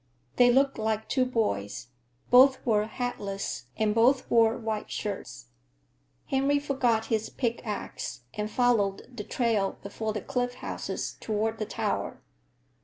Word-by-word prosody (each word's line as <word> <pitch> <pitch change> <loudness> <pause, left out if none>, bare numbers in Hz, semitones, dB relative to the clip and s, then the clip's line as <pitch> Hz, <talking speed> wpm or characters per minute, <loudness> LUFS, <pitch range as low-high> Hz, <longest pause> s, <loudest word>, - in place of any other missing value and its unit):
They 245 0 +7
looked 275 +1 +3
like 220 0 -1
two 255 -2 +2
boys. 120 - -1 0.4
Both 260 +2 +7
were 215 -3 +2
hatless 200 - -4
and 215 -1 +2
both 250 +4 +4
wore 225 -1 +5
white 220 -2 -3
shirts. - - -5 0.8
Henry 275 +1 +2
forgot 255 -6 +1
his 220 0 0
pick 235 -3 -2
axe 165 - -5
and 210 0 -3
followed 235 -1 +1
the 210 - -4
trail 220 -4 0
before 215 +2 -3
the 210 -1 -3
cliff 245 +2 -2
houses - - -4
toward 220 +1 -1
the 215 - -2
tower. - - -2
225 Hz, 135 wpm, -28 LUFS, 210-245 Hz, 0.8 s, They